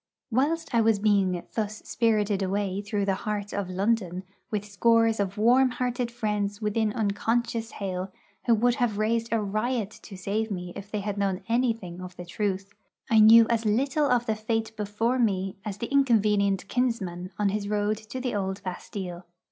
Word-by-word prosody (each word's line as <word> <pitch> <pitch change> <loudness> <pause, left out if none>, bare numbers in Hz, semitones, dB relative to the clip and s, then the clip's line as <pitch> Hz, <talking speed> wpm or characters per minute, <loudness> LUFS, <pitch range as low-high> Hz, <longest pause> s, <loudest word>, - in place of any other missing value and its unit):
Whilst 300 +6 0
I 230 - +4
was 225 -1 +3
being 195 -4 +2
thus 215 -1 -3
spirited 210 -3 +1
away 195 0 -1
through 205 -1 -1
the 195 - +2
heart 205 0 -3
of 200 -2 -2
London, 190 -1 0 0.3
with 210 -1 -2
scores 225 +2 +3
of 200 0 -1
warm 250 +5 +5
hearted 245 -1 -2
friends 210 -3 -2
within 215 0 0
unconscious 225 +2 -1
hail 190 -1 -4 0.4
who 235 - +6
would 240 +3 +3
have 225 -4 +1
raised 225 +2 0
a 230 - +2
riot 215 +1 -1
to 195 - -10
save 210 +4 -2
me 180 -3 -5
if 200 0 -8
they 210 -1 -2
had 205 0 -3
known 195 -2 -1
anything 225 -7 -1
of 180 -1 -8
the 180 - -7
truth, 195 +1 -3 0.4
I 220 - +6
knew 225 +2 +9
as 230 -1 +1
little 270 +7 +1
of 245 -1 +2
the 220 - 0
fate 220 +1 -2
before 215 +4 -1
me 195 -5 0
as 205 -2 -5
the 235 +5 -5
inconvenient 210 -8 +3
kinsman 190 -8 -1
on 210 -1 +2
his 200 0 -2
road 210 0 +1
to 220 +4 -7
the 250 -1 -2
old 190 -1 -2
Bastille. 180 -1 -6
210 Hz, 180 wpm, -27 LUFS, 195-230 Hz, 0.4 s, knew